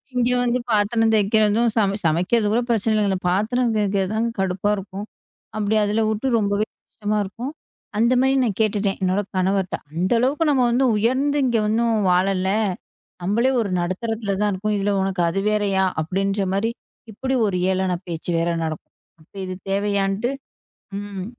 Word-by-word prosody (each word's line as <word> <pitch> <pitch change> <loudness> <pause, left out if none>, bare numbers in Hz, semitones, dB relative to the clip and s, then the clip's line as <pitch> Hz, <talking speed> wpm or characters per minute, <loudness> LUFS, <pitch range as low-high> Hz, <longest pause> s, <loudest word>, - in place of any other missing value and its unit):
இங்க 245 -1 +2
வந்து 245 +1 +1
பாத்திரம் 225 +2 +2
தேய்க்கறதும் 215 +2 +3
சமை 200 -3 +2
சமைக்கிறது 180 +8 +2
கூட 240 - +3
பிரச்சனை 225 -1 +1
இல்லைங்க. 210 -2 +2
இந்த 190 - 0
பாத்திரம் 225 +6 +1
தேய்க்கறது 200 -1 0
தான் 225 +2 +1
கடுப்பா 190 +1 0
இருக்கும். 195 +1 -7 0.5
அப்படி 210 0 0
அதுல 210 +2 +1
விட்டு 220 +4 -1
ரொம்பவே 205 0 0 0.2
கஷ்டமா 215 0 -2
இருக்கும். 235 +8 -6 0.5
அந்த 235 +3 +3
மாதிரி 265 +1 +3
நான் 210 -6 -1
கேட்டுட்டேன். 205 -2 0
என்னோட 185 +2 +2 0.2
கணவர்ட்ட. 190 0 +1 0.2
அந்த 180 +5 -1
அளவுக்கு 280 +6 +1
நம்ம 255 -3 +3 0.3
உயர்ந்து 260 +7 +1
இங்க 240 -3 +2
ஒண்ணும் 230 +1 +1 0.2
வாழல. 190 +1 +2 0.7
நம்மளே 230 +8 +2
ஒரு 205 - -2
நடுத்தரத்துல 205 +3 -2
தான் 210 0 +2
இருக்கோம். 210 +2 -1
இதுல 200 +1 0
உனக்கு 190 -1 -1
அது 185 +4 -1
வேறயா? 200 -2 +1 0.2
அப்படின்ற 195 +4 -1
மாதிரி 200 +4 +1 0.4
இப்படி 265 +5 -3
ஒரு 185 -3 -1
ஏளன 190 0 0 0.2
பேச்சு 165 0 -5
வேற 170 +1 0
நடக்கும். 160 -1 -5 0.3
அப்ப 155 - -25
இது 185 0 -5 0.2
தேவையான்ட்டு 200 +2 0 0.7
ம். 200 -2 -6
205 Hz, 155 wpm, -22 LUFS, 190-225 Hz, 0.7 s, தேய்க்கறதும்